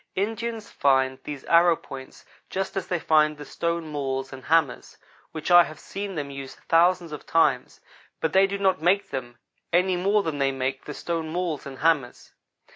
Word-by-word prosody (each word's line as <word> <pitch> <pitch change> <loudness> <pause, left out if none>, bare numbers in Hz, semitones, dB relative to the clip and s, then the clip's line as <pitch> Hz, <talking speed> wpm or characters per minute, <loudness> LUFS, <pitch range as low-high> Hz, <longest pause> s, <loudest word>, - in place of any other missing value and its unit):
Indians 225 +2 -3
find 130 -1 +2
these 145 -3 -6
arrow 170 0 +5
points 135 -4 -11 0.2
just 190 0 -3
as 195 - -3
they 180 - 0
find 155 -2 +3
the 145 - -9
stone 170 -1 -2
mauls 135 -2 -3
and 130 -1 -10
hammers, 160 -5 +1 0.3
which 160 +2 -4
I 175 0 +9
have 155 0 -10
seen 200 -1 -6
them 145 -3 -4
use 135 -1 -8
thousands 170 0 +2
of 150 - -8
times, 140 -6 +1 0.4
but 160 - -1
they 190 +1 +5
do 200 +1 -3
not 190 -3 +1
make 185 +4 +2
them 120 -3 -5 0.3
any 180 +2 +3
more 200 +3 +2
than 155 -4 -3
they 135 0 +2
make 135 0 -3
the 150 - -7
stone 165 -2 -3
mauls 165 -4 -3
and 135 -1 -9
hammers. 150 -5 0
160 Hz, 185 wpm, -25 LUFS, 140-180 Hz, 0.4 s, I